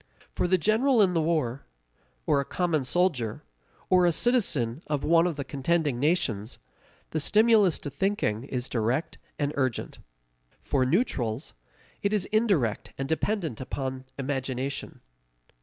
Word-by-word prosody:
For -, -, 0 dB
the 185 Hz, +1 st, +3 dB
general 225 Hz, -, +3 dB
in 185 Hz, -2 st, +2 dB
the 165 Hz, -, +2 dB
war, 150 Hz, -6 st, -1 dB, 0.6 s
or 140 Hz, -, +3 dB
a -, -, -3 dB
common 165 Hz, -1 st, 0 dB
soldier, 135 Hz, -, 0 dB, 0.4 s
or 180 Hz, -1 st, +4 dB
a -, -, +4 dB
citizen 155 Hz, -, +1 dB
of 145 Hz, -2 st, -1 dB
one 165 Hz, +2 st, +4 dB
of 170 Hz, -, -2 dB
the 140 Hz, -, -4 dB
contending 145 Hz, -1 st, 0 dB
nations, 130 Hz, -, 0 dB, 0.5 s
the 160 Hz, -, -1 dB
stimulus 210 Hz, +1 st, +4 dB
to 145 Hz, -, -7 dB
thinking 140 Hz, -, -1 dB
is 125 Hz, -2 st, -3 dB
direct 120 Hz, +6 st, -1 dB, 0.2 s
and 145 Hz, 0 st, -1 dB
urgent. 130 Hz, -4 st, -2 dB, 0.6 s
For 130 Hz, -2 st, +1 dB
neutrals, 130 Hz, -, -1 dB, 0.5 s
it 200 Hz, +1 st, 0 dB
is 205 Hz, -3 st, +2 dB
indirect 195 Hz, -, +1 dB
and 135 Hz, -, -3 dB
dependent 160 Hz, -, -1 dB
upon 130 Hz, 0 st, -4 dB
imagination. 135 Hz, 0 st, -3 dB
150 Hz, 140 wpm, -27 LUFS, 130-180 Hz, 0.6 s, or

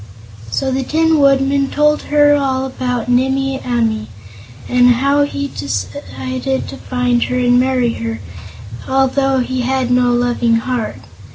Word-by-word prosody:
So 265 Hz, -, -1 dB
the 265 Hz, +1 st, -1 dB
Tin 320 Hz, +3 st, +2 dB
Woodman 275 Hz, 0 st, +2 dB
told 300 Hz, +1 st, +2 dB
her 290 Hz, 0 st, +4 dB
all 265 Hz, -2 st, 0 dB
about 250 Hz, -2 st, -3 dB
Nimmie 265 Hz, +2 st, 0 dB
Amee, 225 Hz, -3 st, -1 dB, 0.6 s
and 245 Hz, 0 st, +4 dB
how 280 Hz, +3 st, +2 dB
he 285 Hz, 0 st, -4 dB
had 280 Hz, -, -9 dB
decided 255 Hz, -, -4 dB
to -, -, -8 dB
find 250 Hz, -1 st, -1 dB
her 250 Hz, -, -2 dB
and 245 Hz, 0 st, +3 dB
marry 250 Hz, -2 st, +1 dB
her, 115 Hz, -1 st, -5 dB, 0.7 s
although 270 Hz, 0 st, +1 dB
he 255 Hz, +1 st, -2 dB
had 255 Hz, 0 st, -1 dB
no 250 Hz, 0 st, +3 dB
Loving 240 Hz, -1 st, +1 dB
Heart. 230 Hz, 0 st, -2 dB
260 Hz, 145 wpm, -16 LUFS, 245-275 Hz, 0.7 s, her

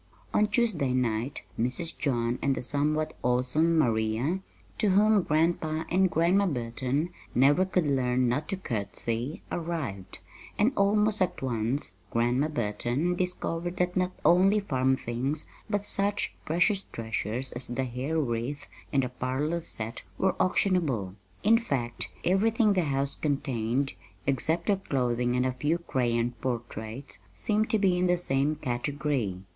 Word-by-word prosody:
On 210 Hz, -, +4 dB
Tuesday 205 Hz, -, +1 dB
night 125 Hz, +1 st, -1 dB, 0.2 s
Mrs. 125 Hz, +8 st, -1 dB
John 120 Hz, -3 st, 0 dB
and 140 Hz, -1 st, +2 dB
the -, -, -4 dB
somewhat 150 Hz, +4 st, 0 dB
awesome 130 Hz, +7 st, +2 dB
Maria 115 Hz, +5 st, +1 dB, 0.4 s
to 215 Hz, -, +3 dB
whom 210 Hz, +2 st, +5 dB
Grandpa 160 Hz, 0 st, +1 dB
and 190 Hz, +1 st, +4 dB
Grandma 175 Hz, +5 st, +3 dB
Burton 130 Hz, +3 st, -1 dB, 0.2 s
never 145 Hz, +9 st, +5 dB
could 185 Hz, -3 st, +1 dB
learn 125 Hz, -3 st, +2 dB
not 145 Hz, +6 st, 0 dB
to 195 Hz, -, -1 dB
curtsy 115 Hz, -, -3 dB
arrived; 140 Hz, -, -4 dB, 0.4 s
and 225 Hz, +6 st, +3 dB
almost 210 Hz, +1 st, +3 dB
at 180 Hz, -6 st, 0 dB
once 115 Hz, -4 st, -1 dB
Grandma 120 Hz, +5 st, +2 dB
Burton 125 Hz, +5 st, -1 dB
discovered 175 Hz, -1 st, -2 dB
that 180 Hz, 0 st, 0 dB
not 185 Hz, 0 st, +1 dB
only 195 Hz, +4 st, +5 dB
"farm 130 Hz, -9 st, +1 dB
things," 130 Hz, +7 st, -2 dB, 0.2 s
but 205 Hz, -1 st, 0 dB
such 205 Hz, 0 st, 0 dB
precious 175 Hz, +5 st, +2 dB
treasures 115 Hz, +2 st, -2 dB
as 120 Hz, +1 st, -4 dB
the 125 Hz, +2 st, -2 dB
hair 130 Hz, +6 st, -2 dB
wreath 125 Hz, +1 st, -2 dB, 0.3 s
and 135 Hz, -1 st, +2 dB
the 125 Hz, -, -2 dB
parlor 135 Hz, +7 st, -2 dB
set 115 Hz, -7 st, -4 dB, 0.2 s
were 190 Hz, -, +2 dB
auctionable. 160 Hz, -, +1 dB, 0.3 s
In 225 Hz, +2 st, +5 dB
fact, 125 Hz, -, -2 dB, 0.2 s
everything 210 Hz, +4 st, +3 dB
the 180 Hz, -3 st, +1 dB
house 140 Hz, -1 st, 0 dB
contained, 135 Hz, -3 st, -1 dB, 0.3 s
except 140 Hz, +5 st, +1 dB
their 205 Hz, -2 st, +3 dB
clothing 125 Hz, -7 st, 0 dB
and 125 Hz, 0 st, +2 dB
a 130 Hz, -, 0 dB
few 150 Hz, +6 st, 0 dB
crayon 120 Hz, -7 st, 0 dB
portraits, 120 Hz, +1 st, -4 dB, 0.2 s
seemed 210 Hz, -, 0 dB
to 220 Hz, -, +3 dB
be 190 Hz, -3 st, +2 dB
in 180 Hz, -, +2 dB
the 180 Hz, 0 st, +3 dB
same 145 Hz, -2 st, 0 dB
category. 135 Hz, -5 st, -2 dB
140 Hz, 140 wpm, -28 LUFS, 125-180 Hz, 0.4 s, whom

